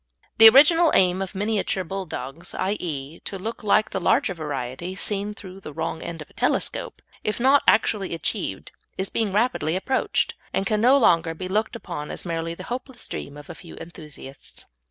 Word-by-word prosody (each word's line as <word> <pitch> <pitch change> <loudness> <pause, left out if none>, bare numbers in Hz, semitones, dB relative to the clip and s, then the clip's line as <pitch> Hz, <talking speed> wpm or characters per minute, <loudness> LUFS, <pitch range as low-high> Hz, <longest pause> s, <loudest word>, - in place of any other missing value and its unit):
The 225 0 +12
original 315 +6 +6
aim 185 0 +4
of 195 +1 -5
Miniature 205 -1 -1
Bulldogs 170 -4 -6
i.e. 165 -6 -3
to 195 - -6
look 220 +5 -6
like 215 +1 +3
the 190 - -2
larger 195 - +2
variety 150 +2 -5
seen 205 +1 -1
through 190 -2 -10
the 165 - -9
wrong 160 +1 -3
end 165 -2 -6
of - - -26
a - - -23
telescope - - -1 0.2
if 215 - -2
not 270 +3 +5
actually 205 -4 +3
achieved, 95 -11 -4 0.3
is 190 +1 -2
being 220 -3 0
rapidly 210 -6 +1
approached, 260 +8 0 0.2
and 195 - 0
can 210 +2 0
no 255 +4 +6
longer 165 -9 +3
be 185 +3 -5
looked 215 +5 -1
upon 170 -9 -6
as - - -6
merely 165 -1 -3
the 185 - -9
hopeless 245 +3 -6
dream 140 +1 -6
of 145 - -11
a 175 - -7
few 165 0 -12
enthusiasts. 150 -5 -11
190 Hz, 180 wpm, -24 LUFS, 165-215 Hz, 0.3 s, The